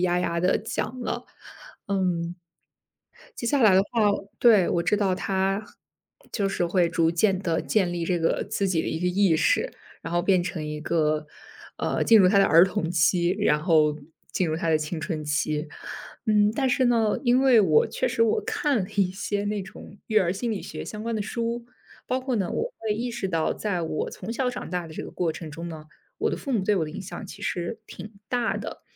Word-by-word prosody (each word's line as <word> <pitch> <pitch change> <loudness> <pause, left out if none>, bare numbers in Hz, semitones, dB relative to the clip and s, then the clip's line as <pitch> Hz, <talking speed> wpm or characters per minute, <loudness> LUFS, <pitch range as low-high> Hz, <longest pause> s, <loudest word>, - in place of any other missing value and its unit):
呀 180 -1 +2
呀 170 -1 -1
地 180 +2 +3
讲 255 +2 -4
了。 245 - -3 0.6
嗯， 180 -3 -1 1.0
接 235 - -4
下 275 +2 +2
来 210 -4 +6
的 190 - +6
话 210 0 +2 0.3
对， 215 -7 +6
我 170 - +1
知 180 +5 +2
道 195 -3 +1
他 195 +2 -1 0.7
就 200 -3 0
是 195 - -1
会 175 0 +2
逐 165 -1 +2
渐 190 +2 +2
地 170 -4 -1
建 190 -5 +1
立 170 -1 -2
这 175 +1 0
个 165 0 +1
自 200 - 0
己 175 -3 +1
的 - - -3
一 - - -2
个 180 - -1
意 180 -2 +3
识， - - +2 0.3
然 165 - -6
后 175 - +2
变 185 -1 +3
成 175 -3 -4
一 150 0 -5
个 155 -1 0 0.5
呃， - - -1
进 225 - +6
入 190 - +6
他 200 +1 +4
的 195 - +6
儿 165 0 +7
童 170 -3 -2
期， 175 +1 +3
然 150 0 +2
后 155 -3 +3 0.4
进 180 - 0
入 155 - -1
他 165 0 -2
的 155 - +5
青 155 +2 -4
春 155 -2 -3
期。 150 +1 -1 0.6
嗯， 210 -2 +4
但 265 0 +1
是 260 +1 +2
呢， 230 -3 +2
因 245 +1 +4
为 255 -4 +6
我 160 -7 +4
确 - - -1
实 230 -1 +1
我 225 - +2
看 285 -4 0
了 185 - -6
一 195 -3 +3
些 200 +2 -3
那 205 0 -1
种 195 +1 -11
育 215 - -2
儿 180 -4 +1
心 230 +5 -3
理 205 - -4
学 - - -7
相 210 0 -7
关 230 +1 -2
的 - - -2
书， 235 +2 -3 0.4
包 255 +1 -1
括 255 -1 -2
呢， 195 -5 0
我 - - -2
会 220 -2 -1
意 240 +3 -3
识 235 -4 -3
到 165 -3 0
在 185 -5 -2
我 160 -1 -2
从 200 +5 -6
小 255 +1 0
长 250 - -6
大 180 -1 -2
的 160 - -11
这 - - -5
个 - - -8
过 170 -3 -1
程 160 0 -8
中 165 +3 -7
呢， 160 -2 -8 0.3
我 - - +1
的 - - -2
父 275 - -5
母 220 -6 +1
对 210 +1 +2
我 170 - +1
的 155 - -7
影 195 - -6
响 200 +2 -8
其 - - -11
实 175 +5 -3
挺 210 - -9 0.2
大 245 0 0
的。 - - -7
190 Hz, 240 characters per minute, -25 LUFS, 170-215 Hz, 1.0 s, 儿